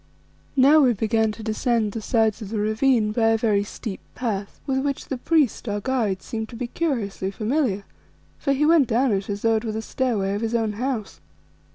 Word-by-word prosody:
Now 280 +4 +6
we 260 -5 +5
began 220 +1 +1
to 220 - -10
descend 220 0 0
the 225 - -5
sides 220 -1 +1
of 205 - -6
the 220 - -3
ravine 215 +1 +2
by 225 +1 +2
a 225 0 +4
very 215 -3 +2
steep 205 0 -6 0.2
path, 205 -5 -3
with 265 -1 0
which 280 0 -3
the 270 - -2
priest, 290 -7 +1
our 205 0 -1
guide, 215 -5 -1
seemed 220 -2 -4
to - - -9
be 245 +2 -3
curiously 235 - -2
familiar, 215 0 -1 0.6
for 275 - 0
he 275 +2 +2
went 315 -4 +5
down 245 +2 +2
it 195 0 -1
as 200 0 -4
though 225 -1 +3
it 215 - -4
were 220 -2 -3
the 220 +1 -3
stairway 220 -8 -1
of 205 - -2
his 225 +1 -1
own 220 -2 0
house. 235 -2 -3
225 Hz, 210 wpm, -23 LUFS, 210-260 Hz, 0.6 s, Now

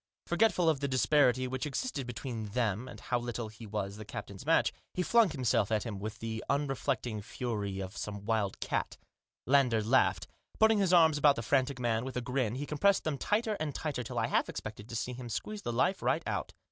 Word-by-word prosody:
Forgetful 180 -1 +2
of 155 -4 +3
the 140 - -1
disparity 130 -1 +3
which 130 +3 -3
existed 140 - -3
between 120 -2 -5
them 115 -1 0
and - - -9
how 125 - -1
little 120 -2 -4
he 110 +1 -11
was 100 -1 -3
the 110 - -7
captain's 100 +3 -8
match, 165 - +3 0.2
he 180 - +1
flung 230 +1 +5
himself 125 - +1
at 110 -1 +1
him 105 -5 -5
with 105 +1 -5
the 115 0 -4
unreflecting 135 -5 -1
frenzy 105 -3 -3
of 95 +1 -6
some 100 0 -5
wild 110 -3 0
cat. - - -2 0.5
Lander 125 -5 +3
laughed. 130 +5 +3 0.3
Putting 220 -1 +5
his 190 -3 +2
arms 160 -4 +6
about 145 -1 +6
the 115 - -4
frantic 135 +2 +1
man, 115 -2 0
with 130 0 -5
a - - 0
grin 125 -2 -1
he 140 +3 -3
compressed 195 +7 +2
them 150 -4 -2
tighter 215 +1 +1
and 155 -3 -3
tighter 150 -5 -2
till 120 - -6
I - - +2
half - - +1
expected 105 0 -7
to 115 - -6
see 125 +3 -2
him 120 -1 -7
squeeze 210 - -4
the 120 - -3
life 180 +11 +1
right - - +1
out. - - -2
125 Hz, 210 wpm, -31 LUFS, 110-145 Hz, 0.5 s, arms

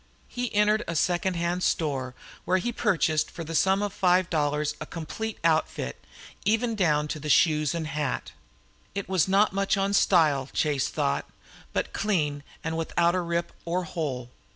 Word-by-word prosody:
He 245 -1 -3
entered 210 +2 +3
a 170 - -3
second 175 +3 +1
hand 170 +1 -1
store, 135 -8 -1 0.3
where 185 - +2
he 215 +6 -1
purchased 175 -8 +1
for 165 - -7
the 165 +1 -6
sum 190 +4 +3
of 205 -1 -2
five 180 -1 +2
dollars 150 -1 0
a - - -5
complete 205 +7 -5
outfit, 155 - 0 0.4
even 225 +3 +1
down 150 -8 +2
to 150 0 -4
shoes 150 0 +3
and 165 -2 -2
hat. 145 -3 -3 0.6
It 200 - -3
was 190 -2 +2
not 195 +1 +3
much 195 0 +1
on 195 +1 0
style, 150 -9 +3
Chase 145 -4 +1
thought, 70 +1 -1 0.4
but - - -2
clean 155 -9 0 0.2
and 160 0 -2
without 170 +1 +1
a 185 - +1
rip 170 0 -2
or 175 +2 -1
hole. 145 -9 -4
170 Hz, 165 wpm, -27 LUFS, 150-190 Hz, 0.6 s, entered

